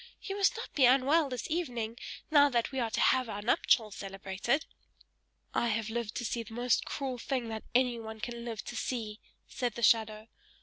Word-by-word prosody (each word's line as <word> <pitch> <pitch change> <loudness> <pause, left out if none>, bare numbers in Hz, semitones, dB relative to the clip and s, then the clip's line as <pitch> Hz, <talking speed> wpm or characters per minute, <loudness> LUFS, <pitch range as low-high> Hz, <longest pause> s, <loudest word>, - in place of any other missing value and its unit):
You 390 - -4
must 400 -1 +2
not - - -7
be 270 - +5
unwell 275 +4 +4
this 250 -2 -4
evening, 245 -10 -2 0.4
now 290 -1 +7
that 235 -3 0
we 265 - -2
are 235 -2 0
to - - -2
have 255 -2 +3
our 205 -1 -5
nuptials 215 -1 +2
celebrated." 195 +8 -2 0.9
"I 235 - +1
have 220 0 -1
lived 235 -1 -3
to 245 - -3
see 235 - -1
the 225 0 -10
most 245 0 +1
cruel 265 -3 -4
thing 250 -2 -2
that 220 -1 -5
anyone 235 -3 0
can 235 +1 -5
live 230 -3 -5
to - - -6
see!" 225 -3 -3 0.3
said 245 -4 -3
the 235 - -5
shadow. 220 -1 +3
235 Hz, 190 wpm, -31 LUFS, 220-255 Hz, 0.9 s, now